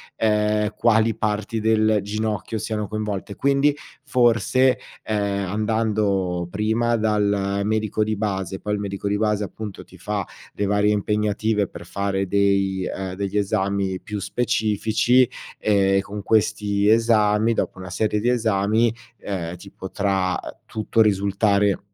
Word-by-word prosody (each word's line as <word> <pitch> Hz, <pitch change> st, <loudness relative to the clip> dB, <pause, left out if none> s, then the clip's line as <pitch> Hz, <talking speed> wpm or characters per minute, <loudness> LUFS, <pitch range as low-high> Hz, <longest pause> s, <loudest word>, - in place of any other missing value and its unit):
ehm, 105 Hz, -1 st, +1 dB
quali 115 Hz, -1 st, +3 dB
parti 110 Hz, +1 st, -1 dB
del 110 Hz, -1 st, +2 dB
ginocchio 110 Hz, +1 st, -3 dB
siano 105 Hz, -1 st, -3 dB
coinvolte; 105 Hz, -1 st, -4 dB
quindi, 140 Hz, +1 st, +2 dB, 0.3 s
forse, 125 Hz, 0 st, +3 dB, 0.3 s
ehm, 100 Hz, -2 st, -1 dB
andando 105 Hz, -4 st, 0 dB
prima 110 Hz, +3 st, +1 dB
dal 100 Hz, -2 st, +1 dB
medico 110 Hz, 0 st, 0 dB
di 110 Hz, 0 st, -1 dB
base, 95 Hz, -3 st, -3 dB
poi 105 Hz, -, -3 dB
il 105 Hz, -, -1 dB
medico 100 Hz, 0 st, -4 dB
di 105 Hz, 0 st, +1 dB
base 105 Hz, -1 st, +1 dB
appunto 105 Hz, 0 st, -7 dB
ti 90 Hz, -, -17 dB
fa 100 Hz, +2 st, -2 dB, 0.3 s
le 100 Hz, -, -1 dB
varie 105 Hz, +1 st, +2 dB
impegnative 105 Hz, 0 st, 0 dB
per -, -, -11 dB
fare 100 Hz, -1 st, -1 dB
dei 100 Hz, -1 st, +1 dB
ehm, 95 Hz, 0 st, -4 dB
degli 100 Hz, +1 st, -2 dB
esami 100 Hz, -2 st, 0 dB
più 105 Hz, -1 st, -5 dB
specifici, 115 Hz, +3 st, +2 dB, 0.3 s
ehm, 95 Hz, -2 st, +3 dB
con 100 Hz, +1 st, -7 dB
questi 105 Hz, -1 st, +1 dB
esami 110 Hz, -1 st, +3 dB
dopo -, -, -2 dB
una 95 Hz, -, -7 dB
serie 105 Hz, +4 st, 0 dB
di 120 Hz, +4 st, +1 dB
esami, 110 Hz, -1 st, +2 dB, 0.2 s
ehm, 90 Hz, -4 st, -4 dB
ti 100 Hz, +3 st, -13 dB
potrà 95 Hz, -1 st, -1 dB, 0.3 s
tutto 110 Hz, +1 st, 0 dB
risultare 100 Hz, 0 st, +2 dB
105 Hz, 135 wpm, -23 LUFS, 100-110 Hz, 0.3 s, quali